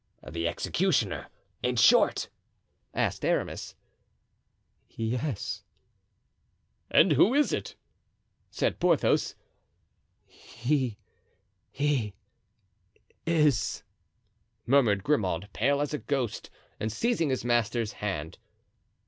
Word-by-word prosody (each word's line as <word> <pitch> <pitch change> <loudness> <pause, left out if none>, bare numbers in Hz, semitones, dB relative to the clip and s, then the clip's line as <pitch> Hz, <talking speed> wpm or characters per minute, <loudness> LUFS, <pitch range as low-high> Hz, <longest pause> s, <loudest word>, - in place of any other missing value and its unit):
"The 85 0 -2
executioner, - - 0 0.3
in 125 0 0
short?" 115 - +4 0.6
asked - - -1
Aramis. - - -1 1.1
"Yes." 115 -3 -3 1.3
"And - - +5
who 235 +7 +5
is 295 0 +3
it?" - - -3 0.7
said - - -1
Porthos. 170 -5 +2 0.9
"He—he—is——" 120 - -4 2.5
murmured 115 -7 +3
Grimaud, 100 - 0
pale 140 +5 +2
as 145 0 -2
a 150 - -1
ghost 130 -6 -2 0.3
and 110 - -2
seizing 195 - 0
his 130 -2 -1
master's 120 -2 +1
hand. 80 -7 -4
120 Hz, 80 wpm, -28 LUFS, 105-140 Hz, 2.5 s, And